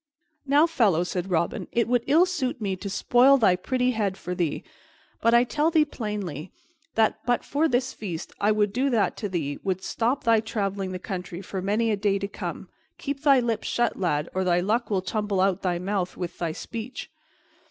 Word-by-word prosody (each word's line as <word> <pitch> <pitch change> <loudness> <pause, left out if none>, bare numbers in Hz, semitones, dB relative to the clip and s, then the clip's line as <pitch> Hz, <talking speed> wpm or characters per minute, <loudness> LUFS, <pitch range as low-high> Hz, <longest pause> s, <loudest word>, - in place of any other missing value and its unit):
"Now, 290 +3 +5
fellow," 220 - +2
said 180 +1 -3
Robin, 170 -1 -1
"it 235 - +1
would 245 -1 +2
ill 320 +6 +5
suit 270 -9 -2
me 200 -3 -1
to 200 +2 -6
spoil 245 +7 +5
thy 205 -8 +4
pretty 250 +7 0
head 205 -5 -1
for 180 -1 -5
thee, 170 -4 -2 0.6
but 230 +1 +4
I 240 - +6
tell 300 +5 +1
thee 315 -2 +4
plainly, 205 - -5 0.4
that 220 -1 +2
but 245 0 +2
for 300 +3 +1
this 255 -1 0
feast 175 -7 -6
I 210 - +4
would 210 -1 +1
do 260 +4 +1
that 230 -5 +1
to 205 - -3
thee 150 -6 -3
would 190 -1 -2
stop 245 +7 -1
thy 230 -2 +4
traveling 200 -3 -2
the 185 - -3
country 180 -1 -6
for 190 0 -5
many 215 +4 +1
a 210 - 0
day 200 -1 +1
to 200 0 -3
come. - - -6 0.3
Keep 280 -1 -4
thy 280 -3 +5
lips 230 -2 -2
shut, 240 -1 +1
lad, 160 -4 0
or 190 - 0
thy 175 -1 +2
luck 215 +5 0
will 190 -3 0
tumble 210 -1 -1
out 190 +1 +4
of - - -33
thy 180 -2 0
mouth 185 0 -2
with 175 -1 -5
thy 170 -2 -1
speech!" 230 +8 -7
210 Hz, 205 wpm, -25 LUFS, 185-245 Hz, 0.6 s, I